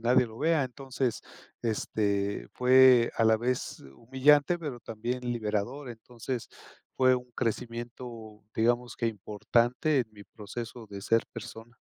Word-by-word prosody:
nadie 125 +2 +4
lo 110 0 -12
vea". 160 -3 +2
Entonces, 130 -1 -3 0.4
este, 100 -3 -1
fue 125 -1 +6
a 115 - +3
la 110 0 +5
vez 125 +2 -2 0.2
humillante, 145 +7 +3
pero 140 -7 -6
también 120 +3 -4
liberador, 115 +5 -2
entonces 120 +1 -6 0.5
fue 130 -1 +4
un 125 0 -5
crecimiento, 115 -2 -5
digamos 120 +2 +1
que 115 - -1
importante 115 +7 +1
en 120 - -3
mi 100 -1 -13
proceso 115 +2 -8
de 100 - -7
ser 115 +3 +2
persona. 110 +1 -9
120 Hz, 130 wpm, -29 LUFS, 110-130 Hz, 0.5 s, fue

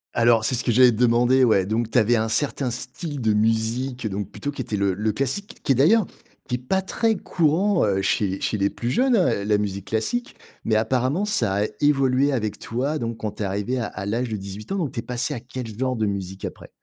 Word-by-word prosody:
Alors 115 -1 +4
c'est 130 - +1
ce 120 - -1
que 120 - +1
j'allais 125 +1 +6
te 110 - -4
demander, 125 +2 +4
ouais, 110 -6 +4
donc 110 +3 -1
tu - - 0
avais 120 +1 +4
un 110 +1 0
certain 135 +1 0
style 145 +5 -5
de 110 -3 +2
musique, 115 +3 0
donc 100 -1 -4
plutôt 145 - -5
qui 140 - -5
était 120 -3 -3
le 100 -1 +1
le 105 +3 -1
classique, 140 - -3
qui 140 - +1
est - - +4
d'ailleurs, 175 - +4 0.4
qui 125 - -1
est - - -1
pas 190 +10 -1
très 225 +3 +1
courant, 175 +2 +1
heu, 95 -1 +1
chez 95 -2 0
chez 105 - -1
les 100 - +2
plus 120 +1 -4
jeunes, 255 0 +3
heu, 175 - +1
la 105 0 +2
musique 100 -1 -3
classique. 110 - -2 0.3
Mais 110 - +2
apparemment, 130 - +1
ça 100 - +1
a - - +1 0.2
évolué 135 -1 +3
avec 110 -5 -2
toi. 140 +6 -2
Donc 115 -1 -3
quand 110 -2 -3
tu - - -6
es - - 0
arrivée 105 +6 -2
à 115 - -1
à 100 - -7
l'âge 115 +4 -1
de 110 - -2
18 100 - -8
ans, 195 - 0
donc 160 -7 -1
tu 115 - -5
es - - -1
passée 125 +5 -2
à 125 - -4
quelle 120 -2 -7
genre 130 -1 0
de 110 -1 0
musique 95 -1 -4
après? - - -8
120 Hz, 245 wpm, -23 LUFS, 105-135 Hz, 0.4 s, j'allais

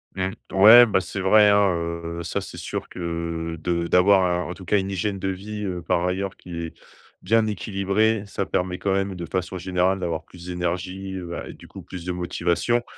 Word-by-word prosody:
Mmh. 95 0 -1 0.2
Ouais, 110 +5 +9
bah, 100 -4 +2
c'est 100 - -6
vrai, 105 +2 +6
hein, 100 -1 +4 0.5
heu, 85 - -4
ça, 85 - -2
c'est - - -9
sûr - - -5
que, - - -13
heu, 85 -1 -3
de 85 +1 -1
d'avoir 95 +1 +5
à, 90 -1 0
en 90 - -5
tout 95 - -12
cas, 105 +2 +3
une 95 - -3
hygiène 100 +1 -2
de 95 - -3
vie, 105 +3 -5
heu, 90 -3 -3
par 85 +2 +1
ailleurs 95 +1 -2
qui 90 -2 -9
est 85 -1 -5 0.5
bien 115 0 +3
équilibrée, 105 +2 0
ça 100 -1 -3
permet 90 0 -1
quand 100 -1 0
même 95 0 -1
de 85 -1 -5
façon 90 +2 -3
générale 95 +1 0
d'avoir 80 -3 -3
plus 85 0 -14
d'énergie, 90 +2 -3
heu, 90 -2 -6
bah, 85 - -5
et - - -8
du - - -15
coup - - -10
plus 90 -2 -9
de 90 - -2
motivation 90 +6 0
95 Hz, 215 wpm, -24 LUFS, 85-100 Hz, 0.5 s, Ouais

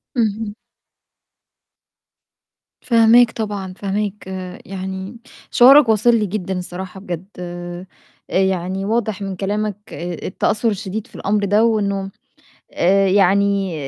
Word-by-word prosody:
اهم. 215 -2 -1 2.3
فاهماك 230 0 +5
طبعًا، 205 -4 -4
فاهماك. 200 0 -3 0.4
يعني 190 +3 -6 0.3
شعورك 265 0 +7
واصل 220 +2 +4
لي 215 - +1
جدًا 190 -2 -3
الصراحة 180 +1 -7
بجد. 180 -1 -6
آآ 175 0 -7 0.4
يعني 190 0 0
واضح 215 -2 -1
من 195 -1 -4
كلامك 205 +2 -2 0.2
آآ 175 +1 -5
التأثُّر 220 +4 0
الشديد 205 0 -4
في - - -19
الأمر 205 0 0
ده، 205 +3 +3
وإنه 200 -3 0 0.6
آآ 195 +2 +3
يعني 195 -1 +2
200 Hz, 110 wpm, -19 LUFS, 190-215 Hz, 2.3 s, شعورك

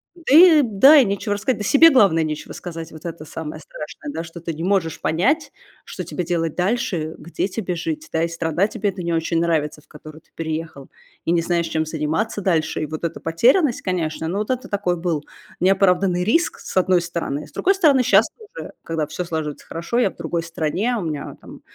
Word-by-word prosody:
Да 335 -5 -2
и 330 -2 +8
да, 260 +5 +6
и 270 - +6
нечего 200 +1 -1
рассказать, 250 +5 -1
да - - -3
себе, 290 +10 +7
главное, 200 - +4
нечего 155 -1 -5
сказать- 165 -2 -7
вот 155 +1 -12
это 165 -2 -6
самое 155 0 -7
страшное, - - -8
да, 165 - -4
что 165 +1 -10
ты 170 0 -4
не 160 +2 -6
можешь 180 -4 0
понять, 255 - 0 0.3
что - - -6
тебе 180 - -4
делать 165 -2 -1
дальше, 190 +1 0
э, 155 0 -4
где 170 +4 -3
тебе 185 -2 -4
жить, 310 - -4
да, 160 - 0
и - - +1
страна 165 +2 0
тебе 210 -1 -2
эта 190 -1 -6
не 170 0 -1
очень 165 0 0
нравится, 160 -3 0
в - - -30
которую 155 0 -12
ты - - -36
переехала, 160 -3 -5 0.3
и - - 0
не 170 -1 +3
знаешь, 170 0 0
чем 160 -1 -1
заниматься 160 +8 -2
дальше. 170 -5 0
И - - -1
вот 155 +2 -5
эта 165 - -4
потерянность, 240 - +2
конечно, 160 -3 -2
ну 185 +5 -2
вот 210 - -3
это 255 0 -3
такой 195 -3 -1
был 165 -3 -2 0.4
неоправданный 180 -1 +3
риск, 330 - +1
с - - -9
одной 185 -1 +3
стороны. 170 -4 -4
С - - -21
другой 390 - +2
стороны, 290 -9 +4
щас 210 -1 +5
тоже, 460 +2 -10
когда 160 -2 -2
всё 160 +4 -4
слаживается 160 -4 -5
хорошо, 170 +8 -4
я 245 -5 +3
в - - -24
другой 170 -1 -3
стране, 170 +8 -1
у - - -3
меня, 155 -3 -4
а, - - -14
там - - -14
175 Hz, 220 wpm, -21 LUFS, 160-215 Hz, 0.4 s, и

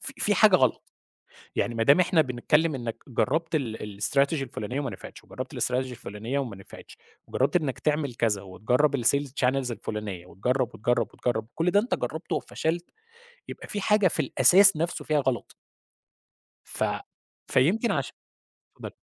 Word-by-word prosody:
ف - - -5
في - - +2
حاجة - - +6
غلط، - - 0 0.6
يعني 120 - 0
ما 115 - 0
دام 140 +9 +6
إحنا 175 -3 +4
بنتكلم 150 +5 +1
إنَّك 120 -3 -5
جرّبت 160 +7 0
ال 110 -7 -3
الStrategy 140 +4 +2
الفلانية 125 +1 -4
وما 135 -3 -3
نفعِتش، - - -11
وجرّبت - - -7
الStrategy - - -1
الفلانية 125 -1 -3
وما 120 -8 -4
نفعِتش، 95 - -13 0.3
وجرّبت 135 +7 +1
إنَّك 150 -6 -1
تعمل 150 -4 -1
كذا، 110 -4 0
وتجرّب 125 +10 +1
الSales 140 +3 +2
Channels 130 -1 +1
الفلانية، 105 -5 -5
وتجرّب، 125 +7 -1
وتجرّب، 120 0 0
وتجرّب، 110 -3 -2
كُلّ 165 +2 +1
ده 205 - +4
أنت 235 - -1
جرّبته 160 +3 -3
وفشلت، 170 +2 -3 0.6
يبقى - - -9
في 205 - -3
حاجة 210 -1 +3
في - - -2
الأساس 195 0 +6
نفسُه 165 +3 -2
فيها 150 -1 +1
غلط. 130 -5 -2 1.1
ف - - -3 0.6
فيمكن 200 - +2
عش - - -1 0.6
اتفضلي. - - -9
130 Hz, 155 wpm, -26 LUFS, 115-160 Hz, 1.1 s, حاجة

